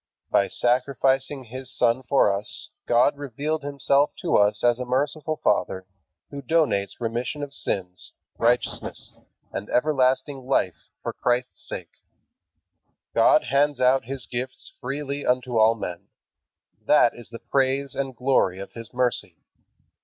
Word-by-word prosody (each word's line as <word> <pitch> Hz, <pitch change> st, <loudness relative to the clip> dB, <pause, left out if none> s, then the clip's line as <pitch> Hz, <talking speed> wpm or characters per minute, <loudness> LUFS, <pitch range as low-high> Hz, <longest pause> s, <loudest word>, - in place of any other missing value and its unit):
By 100 Hz, -, +4 dB
sacrificing 130 Hz, +2 st, +1 dB
His 130 Hz, +2 st, -7 dB
Son 125 Hz, -1 st, +2 dB
for 125 Hz, -6 st, +3 dB
us 100 Hz, +2 st, -2 dB, 0.2 s
God 120 Hz, +4 st, +4 dB
revealed 145 Hz, +3 st, -3 dB
Himself 140 Hz, 0 st, +1 dB
to 175 Hz, -, +1 dB
us 105 Hz, +1 st, +3 dB
as 120 Hz, 0 st, +3 dB
a -, -, -2 dB
merciful 145 Hz, +5 st, -1 dB
Father 95 Hz, -1 st, +1 dB, 0.5 s
who 140 Hz, -, -6 dB
donates 125 Hz, -, +1 dB
remission 120 Hz, +5 st, -3 dB
of 140 Hz, -1 st, -6 dB
sins, 90 Hz, -7 st, -2 dB, 0.3 s
righteousness, 120 Hz, +1 st, 0 dB, 0.4 s
and 100 Hz, +2 st, -5 dB
life -, -, -11 dB
everlasting 130 Hz, -1 st, +1 dB, 0.5 s
for -, -, -3 dB
Christ's 125 Hz, +1 st, -1 dB
sake. -, -, -6 dB, 1.2 s
God -, -, +5 dB
hands 140 Hz, +2 st, +1 dB
out 130 Hz, -1 st, +3 dB
His 135 Hz, +1 st, -3 dB
gifts 125 Hz, +2 st, -4 dB
freely 140 Hz, +2 st, -4 dB
unto 125 Hz, -2 st, +1 dB
all 110 Hz, +1 st, +5 dB
men. 90 Hz, -6 st, -6 dB, 0.8 s
That 125 Hz, -5 st, +5 dB
is 120 Hz, -, -9 dB
the 115 Hz, -, -8 dB
praise 135 Hz, +1 st, 0 dB
and 135 Hz, -2 st, -3 dB
glory 125 Hz, -8 st, +2 dB
of 100 Hz, 0 st, -8 dB
His 115 Hz, -2 st, -8 dB
mercy. 125 Hz, -1 st, 0 dB
130 Hz, 135 wpm, -24 LUFS, 115-140 Hz, 1.2 s, God